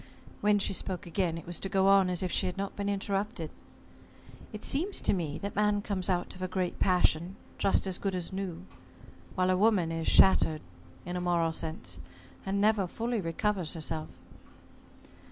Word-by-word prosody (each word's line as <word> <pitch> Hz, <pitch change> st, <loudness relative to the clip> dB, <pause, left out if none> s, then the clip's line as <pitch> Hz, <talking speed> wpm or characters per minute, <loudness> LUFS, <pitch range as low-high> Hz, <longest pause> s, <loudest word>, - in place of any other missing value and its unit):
When 210 Hz, 0 st, +3 dB
she 200 Hz, -, +1 dB
spoke 185 Hz, -1 st, -3 dB
again, 170 Hz, -1 st, -1 dB
it 165 Hz, -, -9 dB
was 175 Hz, -1 st, -3 dB
to 195 Hz, -, -4 dB
go 190 Hz, 0 st, +2 dB
on 195 Hz, -1 st, +5 dB
as 180 Hz, 0 st, 0 dB
if 180 Hz, -, -2 dB
she 190 Hz, -, +2 dB
had 180 Hz, -, -4 dB
not 200 Hz, 0 st, -3 dB
been 200 Hz, 0 st, -2 dB
interrupted, 195 Hz, -3 st, -2 dB, 1.0 s
"It 215 Hz, 0 st, -8 dB
seems 355 Hz, +9 st, +1 dB
to -, -, +2 dB
me 160 Hz, -5 st, -2 dB
that 200 Hz, 0 st, -5 dB
man 210 Hz, -1 st, +2 dB
comes 195 Hz, -2 st, -2 dB
out 180 Hz, -1 st, 0 dB
of 185 Hz, -, -12 dB
a 185 Hz, -, -1 dB
great 185 Hz, -1 st, -2 dB
passion 180 Hz, -1 st, +2 dB, 0.2 s
just 195 Hz, -, +2 dB
as 190 Hz, -2 st, -2 dB
good 195 Hz, -2 st, -2 dB
as 180 Hz, 0 st, -4 dB
new, 190 Hz, -, -5 dB, 0.7 s
while 185 Hz, 0 st, +2 dB
a -, -, +3 dB
woman 195 Hz, -5 st, +3 dB
is 165 Hz, 0 st, -3 dB
shattered 160 Hz, -5 st, +5 dB, 0.4 s
in 175 Hz, -, -4 dB
a 180 Hz, -, -2 dB
moral 170 Hz, -2 st, +1 dB
sense 155 Hz, -, -4 dB, 0.5 s
and 195 Hz, +1 st, 0 dB
never 210 Hz, -2 st, +3 dB
fully 230 Hz, +4 st, -2 dB
recovers 180 Hz, 0 st, -1 dB
herself." 155 Hz, -1 st, -3 dB
185 Hz, 185 wpm, -30 LUFS, 170-200 Hz, 1.0 s, on